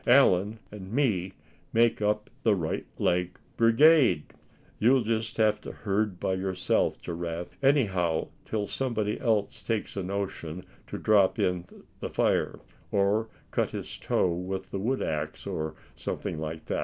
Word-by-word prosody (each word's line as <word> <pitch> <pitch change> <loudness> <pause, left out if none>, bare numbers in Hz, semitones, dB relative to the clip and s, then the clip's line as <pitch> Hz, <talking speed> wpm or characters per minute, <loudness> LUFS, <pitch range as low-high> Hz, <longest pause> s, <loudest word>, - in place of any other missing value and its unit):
Allan 110 -5 +5
and 100 -2 -9
me 105 -9 +1 0.4
make 115 -1 +3
up 105 0 +1
the 110 -5 +4
right 80 -4 -2
leg 90 0 0 0.2
brigade. 115 - +5 0.6
You'll 125 +3 +5
just 110 0 -1
have 110 -1 +3
to - - -7
herd 100 -2 -1
by 95 - 0
yourself, 95 -1 0
Giraffe 85 0 -5
anyhow 95 - +2
till 105 -2 -2
somebody 110 -4 -1
else 110 -4 0
takes 115 -2 -2
a 100 - -1
notion 90 -3 -4 0.2
to - - -5
drop 100 -3 +4
in 90 -1 0 0.3
the - - -4
fire, - - +1 0.3
or 105 +3 +2 0.2
cut - - +1
his - - -6
toe 90 - +1
with 95 +2 -4
the 95 - -2
wood 130 +7 0
axe, 75 0 -3
or 80 0 -3 0.2
somethin' - - -4
like 80 0 -5
that." - - -1
100 Hz, 145 wpm, -28 LUFS, 90-110 Hz, 0.6 s, Allan